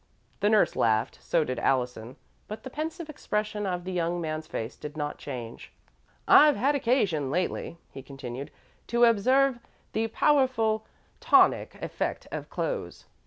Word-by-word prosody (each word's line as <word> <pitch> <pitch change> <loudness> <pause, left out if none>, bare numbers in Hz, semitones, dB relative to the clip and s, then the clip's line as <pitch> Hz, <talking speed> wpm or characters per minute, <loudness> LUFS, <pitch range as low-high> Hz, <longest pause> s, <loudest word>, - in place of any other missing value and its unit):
The 205 - +2
nurse 215 -1 +3
laughed; 110 0 +1
so 165 - +1
did 130 -3 -3
Allison, 125 -2 -1 0.3
but 215 +1 -7
the 260 - -8
pensive 315 +2 -5
expression 210 -8 -3
of 180 -1 -2
the 185 - -5
young 175 -1 -1
man's 155 -1 -4
face 115 -6 -5
did 150 +1 -9
not 145 -1 -3
change. 120 -5 -7 0.6
"I've 300 -1 +7
had 280 +3 +2
occasion 215 - +1
lately," 175 +1 -2
he 135 - -9
continued, 135 -1 -7 0.4
"to 235 0 +2
observe 255 +4 +3 0.3
the 225 +1 0
powerful 225 -4 +2 0.3
tonic 475 +1 +4
effect - - -3
of - - -5
clothes. - - -4
200 Hz, 145 wpm, -27 LUFS, -, 0.6 s, I've